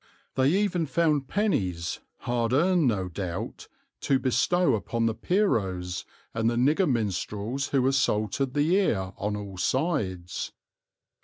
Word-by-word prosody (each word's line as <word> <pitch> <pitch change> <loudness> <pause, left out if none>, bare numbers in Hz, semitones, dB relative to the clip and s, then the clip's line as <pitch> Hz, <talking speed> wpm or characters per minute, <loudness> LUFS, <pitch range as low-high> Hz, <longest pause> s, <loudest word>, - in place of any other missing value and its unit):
They 130 +1 +3
even 180 -2 +1
found 150 -1 +1
pennies, 95 - -1 0.2
hard 120 -1 0
earned 170 +1 +3
no 100 -6 0
doubt, 90 -1 -5 0.3
to 135 - +2
bestow 130 +6 +2
upon 115 +2 -1
the 115 - +2
Pierrots 95 - 0 0.3
and 115 0 +1
the 120 - -1
nigger 150 +8 +3
minstrels 110 +3 -1
who 135 -2 +1
assaulted 130 -1 +1
the 150 +5 +3
ear 95 - 0
on 105 +1 -2
all 100 -2 -7
sides. 100 - -1
125 Hz, 130 wpm, -27 LUFS, 100-150 Hz, 0.3 s, They